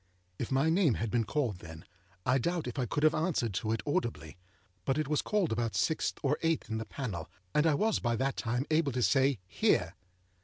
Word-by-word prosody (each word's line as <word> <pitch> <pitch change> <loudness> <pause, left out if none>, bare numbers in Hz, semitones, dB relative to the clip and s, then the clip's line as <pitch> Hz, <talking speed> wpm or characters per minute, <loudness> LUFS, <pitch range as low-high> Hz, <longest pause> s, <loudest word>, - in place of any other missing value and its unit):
If 120 - -3
my 135 +4 +3
name 165 - +3
had 115 -1 -2
been 115 -2 +1
called 120 - -1
then, 80 +1 -10 0.4
I 130 +2 +3
doubt 170 +5 -1
if 125 +2 -4
I 125 - 0
could 145 +7 -1
have 155 0 +5
answered 155 - 0
to 110 +4 -1
it 115 -2 -1
audibly. 80 - -2 0.5
But 135 +1 0
it 155 -2 0
was 150 0 +1
called 205 -6 0
about 115 0 -1
sixth 160 - 0
or 140 +1 +1
eighth 165 -8 0
in 110 - -1
the 110 - -4
panel, 105 - -5 0.2
and 150 +2 +3
I 155 - +4
was 220 +7 +1
by 120 -1 0
that 135 +3 0
time 125 +3 -1
able 155 -4 +2
to 125 0 0
say, 135 0 +3 0.2
âHere! - - +3
130 Hz, 220 wpm, -31 LUFS, 115-155 Hz, 0.5 s, have